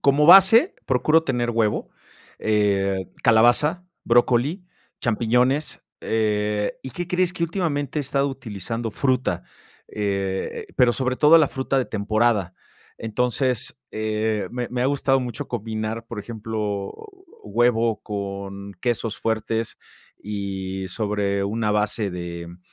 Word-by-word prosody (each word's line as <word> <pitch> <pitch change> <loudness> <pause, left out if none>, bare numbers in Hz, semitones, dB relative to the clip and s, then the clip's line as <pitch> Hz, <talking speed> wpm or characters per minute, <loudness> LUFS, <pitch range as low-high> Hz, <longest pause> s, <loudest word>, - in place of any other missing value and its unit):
como 145 +2 +4
base, 195 - +8
procuro 155 +6 +3
tener 120 -3 0
huevo, 110 -2 0 0.5
eh, 100 -3 +1 0.2
calabaza, 150 +10 +4 0.2
brócoli, 125 +9 +2 0.4
champiñones, 125 +5 +1 0.2
eh, 105 -1 0
¿y 130 - -7
qué 175 +7 -5
crees? 180 0 +1
que 170 - -4
últimamente 155 -5 -1
he - - +1
estado 140 0 0
utilizando 115 -3 -5
fruta, 130 -9 0 0.5
eh, 95 -2 -2
eh, - - -19
pero 125 -1 +5
sobre 130 0 -1
todo 150 +4 +7
la 155 -4 +5
fruta 135 +1 -2
de 130 - +1
temporada. 105 -3 0 0.4
Entonces, 125 +2 -1
eh, 110 0 -1
me 125 -1 -4
me 125 0 -2
ha - - +2
gustado 135 -1 +2
mucho 120 -3 -5
combinar, 110 +1 -4
por 115 - -7
ejemplo, 105 -2 -4 0.5
huevo 115 - +1
con 100 -1 -6
quesos 115 -3 -1
fuertes, 115 0 -2 0.4
y 95 -2 -4
sobre 100 0 -1
una 105 +1 -1
base 105 -1 0
de, 85 -1 -6
mm, 85 +1 -12
115 Hz, 125 wpm, -23 LUFS, 105-130 Hz, 0.5 s, base